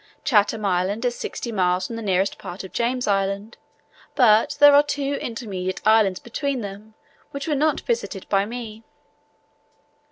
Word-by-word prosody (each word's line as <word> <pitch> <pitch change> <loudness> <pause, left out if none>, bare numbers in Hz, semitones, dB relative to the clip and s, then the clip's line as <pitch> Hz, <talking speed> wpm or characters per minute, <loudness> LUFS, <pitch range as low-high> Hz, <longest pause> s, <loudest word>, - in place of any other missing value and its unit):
Chatham 215 -3 +2
Island 195 +5 0
is 245 - +1
sixty 240 - -5
miles 185 -3 +1
from 230 - -6
the 230 - -5
nearest 195 -2 0
part 180 +3 -7
of 190 - -11
James 245 +1 -1
Island, 200 +2 -1 0.6
but 225 -4 +4
there 290 0 +8
are 285 - +8
two 285 -1 -2
intermediate 195 -6 -4
islands 215 -4 +4
between 270 +2 -3
them 205 +2 -9 0.3
which 280 +1 -6
were 310 - +1
not 300 +2 +1
visited 460 - -3
by 195 -1 +2
me. 225 -2 -7
220 Hz, 155 wpm, -23 LUFS, 195-255 Hz, 0.6 s, there